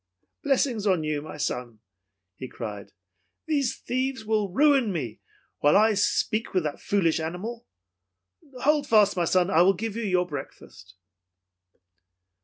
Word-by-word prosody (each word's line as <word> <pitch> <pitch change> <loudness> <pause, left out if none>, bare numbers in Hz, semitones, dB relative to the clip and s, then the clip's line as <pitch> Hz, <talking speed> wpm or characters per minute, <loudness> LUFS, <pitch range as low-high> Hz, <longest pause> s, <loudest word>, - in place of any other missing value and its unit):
"Blessings 255 -6 +1
on 185 -5 +2
you, 150 -1 -2
my 155 - -9
son!" 125 -5 -3 0.6
he 130 - -7
cried. 105 -5 -8 0.5
"These 290 -5 0
thieves 255 -2 -3
will 215 -2 0
ruin 275 -1 +3
me 125 - -4 0.4
while 145 +5 +4
I 215 +1 +4
speak 215 +1 0
with 185 - +2
that 150 -2 -4
foolish 170 -6 +1
animal. 185 +9 -5 0.9
Hold 300 0 +2
fast, 210 -2 +4
my 175 -2 +1
son, 185 +2 +2
and 160 - +4
I - - +7
will 190 +2 +5
give 220 +2 -4
you 230 - -3
your 185 -4 +1
breakfast." 135 - -10
195 Hz, 145 wpm, -26 LUFS, 155-230 Hz, 0.9 s, I